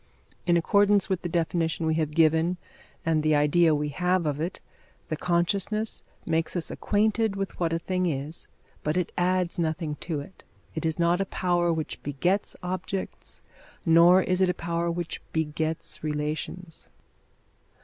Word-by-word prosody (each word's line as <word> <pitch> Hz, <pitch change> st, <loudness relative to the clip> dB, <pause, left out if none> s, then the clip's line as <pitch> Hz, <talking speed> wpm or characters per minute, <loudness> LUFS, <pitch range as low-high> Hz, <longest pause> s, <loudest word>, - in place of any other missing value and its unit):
In 170 Hz, -1 st, +5 dB
accordance 200 Hz, +3 st, +3 dB
with 190 Hz, -2 st, 0 dB
the 175 Hz, -, -3 dB
definition 165 Hz, -1 st, 0 dB
we 160 Hz, -, +2 dB
have 155 Hz, -2 st, 0 dB
given 160 Hz, +3 st, +3 dB, 0.5 s
and 160 Hz, -1 st, +2 dB
the 155 Hz, 0 st, +3 dB
idea 155 Hz, +2 st, +4 dB
we 150 Hz, 0 st, -1 dB
have 180 Hz, +3 st, +1 dB
of 150 Hz, 0 st, -1 dB
it, 175 Hz, +3 st, -3 dB, 0.5 s
the 155 Hz, -, 0 dB
consciousness 190 Hz, +6 st, 0 dB, 0.2 s
makes 165 Hz, +1 st, 0 dB
us 170 Hz, -2 st, -1 dB
acquainted 215 Hz, 0 st, +1 dB
with 195 Hz, -1 st, -4 dB
what 170 Hz, -2 st, +1 dB
a 165 Hz, -, +1 dB
thing 185 Hz, +1 st, -1 dB
is, 150 Hz, +1 st, -3 dB, 0.3 s
but 150 Hz, +3 st, -1 dB
it 180 Hz, -, 0 dB
adds 180 Hz, -1 st, +1 dB
nothing 160 Hz, -2 st, -1 dB
to 160 Hz, -4 st, -3 dB
it. 145 Hz, +6 st, -11 dB, 0.3 s
It 160 Hz, 0 st, -1 dB
is 160 Hz, -, -1 dB
not 170 Hz, +2 st, +2 dB
a -, -, +1 dB
power 175 Hz, -2 st, +1 dB
which 160 Hz, -2 st, -3 dB
begets 175 Hz, +8 st, 0 dB
objects, 185 Hz, +1 st, -4 dB, 0.4 s
nor 170 Hz, +3 st, +7 dB
is 185 Hz, 0 st, 0 dB
it 185 Hz, -, +4 dB
a 180 Hz, -, 0 dB
power 170 Hz, 0 st, -1 dB
which 170 Hz, 0 st, -3 dB
begets 160 Hz, 0 st, -2 dB
relations. 155 Hz, +3 st, -4 dB
170 Hz, 160 wpm, -27 LUFS, 160-180 Hz, 0.5 s, nor